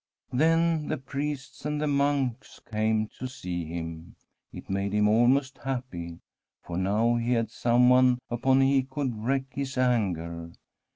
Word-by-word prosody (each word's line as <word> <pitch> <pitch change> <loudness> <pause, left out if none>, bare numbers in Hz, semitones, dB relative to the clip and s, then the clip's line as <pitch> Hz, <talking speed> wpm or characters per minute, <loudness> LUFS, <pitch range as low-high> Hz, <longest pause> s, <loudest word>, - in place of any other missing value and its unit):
Then 165 +2 +2
the - - -1
priests 140 +1 -5
and 150 0 -2
the 150 - 0
monks 140 -3 0
came 110 0 +1
to 130 - -3
see 90 -9 -5
him. 80 0 -7 0.4
It - - -10
made 100 +1 -2
him 105 0 +3
almost 125 +5 +3
happy, 120 -11 -5 0.5
for 85 - -6
now 105 +6 +2
he 120 +1 0
had 115 -2 0
someone 125 +1 +4
upon 130 +3 +2
whom 135 - +5
he 135 0 +4
could 130 -1 -3
wreak 130 +5 -1
his 140 -1 -4
anger. 85 -9 0
125 Hz, 150 wpm, -27 LUFS, 105-135 Hz, 0.5 s, whom